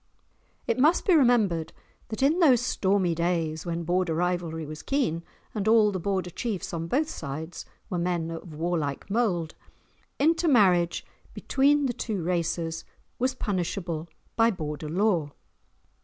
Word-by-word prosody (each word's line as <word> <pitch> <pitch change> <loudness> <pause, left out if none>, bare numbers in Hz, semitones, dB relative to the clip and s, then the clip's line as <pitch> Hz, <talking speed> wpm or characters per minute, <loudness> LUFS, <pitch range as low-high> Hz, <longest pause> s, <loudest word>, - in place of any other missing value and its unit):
It - - 0
must 310 +6 +4
be 375 - +4
remembered 225 - +3 0.4
that 220 +4 -3
in 305 +6 +3
those 275 -9 +6
stormy 195 -6 +1
days, 165 -1 -1
when 170 0 -2
Border 175 -1 0
rivalry 170 -2 -1
was 155 +1 -8
keen, 255 - 0 0.3
and 210 -1 -2
all 220 -2 +5
the 190 - -3
Border 185 0 -2
chiefs, 210 -3 -4
on 165 0 -3
both 295 - +1
sides, 160 - -6 0.2
were 180 - -2
men 170 -2 -1
of 165 -1 -8
war 170 +2 0
like 145 +5 -4
mould, 185 -8 0 0.6
intermarriage 235 - +3 0.3
between 285 +1 +2
the 250 - 0
two 210 -6 -3
races 165 -1 -1 0.4
was 255 +1 +1
punishable 175 -4 -3 0.3
by 225 0 +4
Border 155 -6 -4
law. 175 -5 +1
180 Hz, 140 wpm, -27 LUFS, 165-230 Hz, 0.6 s, those